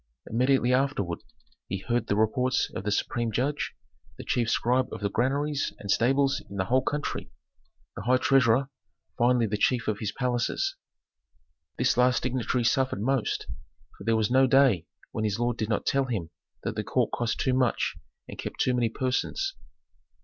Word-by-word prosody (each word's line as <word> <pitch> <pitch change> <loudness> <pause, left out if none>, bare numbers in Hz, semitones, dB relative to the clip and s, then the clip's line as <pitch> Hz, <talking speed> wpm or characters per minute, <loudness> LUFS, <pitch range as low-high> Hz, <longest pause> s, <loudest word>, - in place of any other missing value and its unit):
Immediately 125 +1 +2
afterward 125 -10 0 0.5
he 95 - -2
heard 120 +4 -1
the 100 - +1
reports 125 +4 +1
of 90 - -5
the 105 - 0
supreme 115 +2 -1
judge, 135 +7 -1 0.4
the - - -7
chief 120 -2 0
scribe 125 +3 +1
of - - -6
the 100 -1 -1
granaries 140 +2 0
and 100 - -4
stables 135 +4 +2
in 100 - -8
the 95 -1 0
whole 130 +6 +3
country, 145 +3 -3 0.7
the - - -5
high 125 +5 +3
treasurer, 135 0 +3 0.5
finally 120 0 +4
the 105 -1 -2
chief 120 0 +1
of 105 -2 -1
his 105 -3 -2
palaces. 125 -2 -1 1.0
This - - +2
last 125 0 +3
dignitary 125 0 0
suffered 130 -1 +1
most, 135 -1 0 0.5
for - - -11
there 115 0 +2
was 110 +1 +1
no 130 +1 +5
day 130 -10 +4 0.2
when 110 - -3
his 105 -1 0
lord 120 0 0
did 110 -1 -2
not 105 - 0
tell 135 0 +2
him 100 -10 -3 0.3
that - - -2
the - - -3
court - - 0
cost 120 -2 -1
too 130 - +1
much, 125 -2 +1 0.3
and - - -10
kept - - -6
too 130 - +2
many 120 -2 +1
persons. 135 - -1
125 Hz, 175 wpm, -27 LUFS, 110-130 Hz, 1.0 s, no